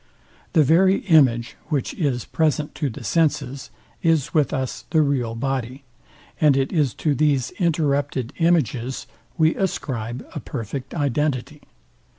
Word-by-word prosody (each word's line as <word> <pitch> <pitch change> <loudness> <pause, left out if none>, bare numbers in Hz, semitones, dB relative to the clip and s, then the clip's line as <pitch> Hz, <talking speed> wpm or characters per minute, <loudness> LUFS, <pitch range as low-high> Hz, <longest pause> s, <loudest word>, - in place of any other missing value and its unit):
The 160 -4 +5
very 185 +7 +4
image, 125 - +3
which 145 -6 -1
is 135 -8 -1
present 150 -2 0
to 145 - -2
the 115 - -9
senses, 140 +2 0 0.3
is 165 -4 +1
with 150 -3 +2
us 130 -1 -3
the 160 -2 +3
real 125 -6 -1
body; 130 +1 -3 0.6
and 145 -3 +4
it 135 0 0
is 150 -7 +1
to 150 - 0
these 140 -3 +1
interrupted 145 - 0
images 135 -7 +1 0.3
we 160 -1 +4
ascribe 125 - -3
a - - -4
perfect 130 +3 -6
identity. 145 -1 -1
140 Hz, 135 wpm, -22 LUFS, 125-155 Hz, 0.6 s, The